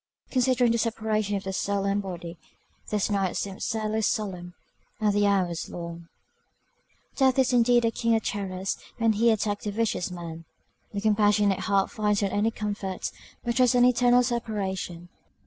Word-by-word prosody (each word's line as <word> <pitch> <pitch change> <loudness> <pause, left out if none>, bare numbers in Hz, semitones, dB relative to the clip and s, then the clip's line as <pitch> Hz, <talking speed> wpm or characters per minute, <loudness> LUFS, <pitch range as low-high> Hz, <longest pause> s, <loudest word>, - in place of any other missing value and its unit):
Considering 255 -2 +3
the 235 - +1
separation 215 -2 0
of 195 - -3
the 190 - -4
soul 200 +1 -1
and 200 +1 +1
body, 175 -3 -7 0.5
this 210 -2 0
night 195 -3 0
seemed 195 +1 -4
sadly 220 0 -1
solemn, 185 -5 -2 0.4
and 210 -2 +2
the 205 0 +3
hours 185 -4 0
long. 170 -1 -7 1.1
Death 265 -2 +3
is 260 -1 +3
indeed 240 0 +4
a 230 - +2
king 230 0 +1
of 220 - 0
terrors 190 -1 -3 0.2
when 225 -2 +3
he 230 +3 +3
attacks 210 -2 0
the 210 - -1
vicious 215 -4 -1
man! 170 -2 -7 0.5
The 200 - -3
compassionate 210 -2 +3
heart 195 -1 +1
finds 210 -1 0
not 195 - 0
any 210 +2 +2
comfort; 205 -3 -4 0.3
but 240 - -1
dreads 250 -1 +4
an 245 0 +6
eternal 245 0 +4
separation. 195 -7 -3
205 Hz, 165 wpm, -26 LUFS, 195-230 Hz, 1.1 s, an